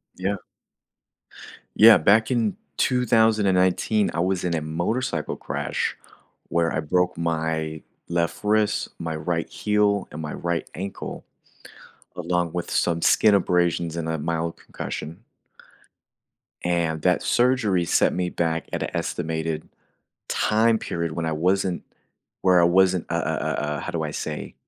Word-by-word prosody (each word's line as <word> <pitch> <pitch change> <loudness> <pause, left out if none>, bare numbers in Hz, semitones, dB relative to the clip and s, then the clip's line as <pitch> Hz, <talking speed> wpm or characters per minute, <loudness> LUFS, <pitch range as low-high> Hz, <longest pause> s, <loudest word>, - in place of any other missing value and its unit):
Yeah. 95 +2 -1 1.4
Yeah, 110 0 +9
back 110 +8 +4
in 115 -5 +1 0.2
2019, 110 -4 +2
I 85 - -2
was 95 +1 0
in 90 -1 -1
a 80 - -1
motorcycle 85 - -2
crash - - -3 0.5
where 85 -1 +1
I 80 - -1
broke 90 +3 0
my 80 -1 -2 0.3
left 85 +2 -1
wrist, 105 0 +1
my 80 -1 -3
right 85 +1 -2
heel, 105 -1 +1
and 75 - -6
my 75 - -5
right 85 -1 -3
ankle, 95 +3 -6 0.9
along 90 -1 -1
with 85 -1 -4
some 85 -1 +1
skin 105 -2 +5
abrasions 85 -3 +1
and 80 -1 -3
a 80 -1 -1
mild 85 +2 -2
concussion. 85 +9 -7 1.4
And 85 -3 0
that - - +2
surgery 120 -8 +2
set - - +3
me 90 -1 -1
back 80 -1 -1
at - - -2
a - - -5
estimated 80 0 -3 0.6
time 110 +1 +2
period 85 -5 -3
when 80 0 -3
I 80 - 0
wasn't 90 +3 0 0.6
where 90 -2 +5
I - - +5
wasn't 90 0 +3
uh - - -1
uh - - -1
uh, 75 -2 -2
how - - -4
do 80 -2 -2
I 75 - -3
say? - - -5
85 Hz, 140 wpm, -24 LUFS, 80-100 Hz, 1.4 s, Yeah